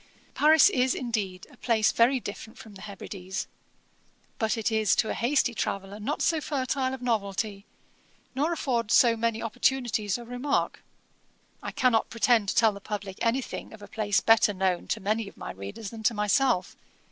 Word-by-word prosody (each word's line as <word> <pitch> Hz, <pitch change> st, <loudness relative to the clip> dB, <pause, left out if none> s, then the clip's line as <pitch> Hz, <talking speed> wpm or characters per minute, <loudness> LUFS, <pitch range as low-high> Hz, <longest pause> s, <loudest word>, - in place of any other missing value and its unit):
'Paris 310 Hz, +1 st, +6 dB
is, 255 Hz, -7 st, +1 dB
indeed, 210 Hz, -7 st, -3 dB
a -, -, -18 dB
place 220 Hz, -3 st, +2 dB
very 250 Hz, +3 st, +3 dB
different 220 Hz, +2 st, -8 dB
from 225 Hz, -5 st, -12 dB
the 195 Hz, -, -12 dB
Hebrides, 190 Hz, -2 st, -6 dB, 0.9 s
but 220 Hz, +1 st, 0 dB
it 225 Hz, 0 st, -1 dB
is 220 Hz, -2 st, +2 dB
to 220 Hz, -, +1 dB
a -, -, -1 dB
hasty 245 Hz, 0 st, +1 dB
traveller 195 Hz, -1 st, -4 dB
not 275 Hz, +8 st, -2 dB
so 325 Hz, -2 st, +1 dB
fertile 260 Hz, -2 st, -1 dB
of 255 Hz, -, -12 dB
novelty, 205 Hz, -3 st, -2 dB, 0.7 s
nor 290 Hz, +6 st, 0 dB
affords 240 Hz, -9 st, 0 dB
so 235 Hz, -2 st, +5 dB
many 225 Hz, 0 st, -1 dB
opportunities 230 Hz, -3 st, 0 dB
of 240 Hz, -1 st, -10 dB
remark. 250 Hz, +3 st, -1 dB, 0.8 s
I -, -, -5 dB
cannot 245 Hz, -3 st, +1 dB
pretend 230 Hz, -3 st, +2 dB
to -, -, -1 dB
tell 225 Hz, -2 st, +5 dB
the 200 Hz, 0 st, -10 dB
publick 200 Hz, -2 st, -6 dB
any 240 Hz, +3 st, +2 dB
thing -, -, -8 dB
of 215 Hz, -2 st, -12 dB
a -, -, -9 dB
place 205 Hz, -3 st, 0 dB
better 225 Hz, -2 st, +4 dB
known 185 Hz, -2 st, 0 dB
to -, -, -1 dB
many 215 Hz, +2 st, -1 dB
of -, -, -13 dB
my -, -, -6 dB
readers 100 Hz, -, -8 dB
than 225 Hz, -1 st, -8 dB
to 225 Hz, +1 st, +1 dB
myself. 210 Hz, 0 st, +1 dB
225 Hz, 180 wpm, -27 LUFS, 205-250 Hz, 0.9 s, Paris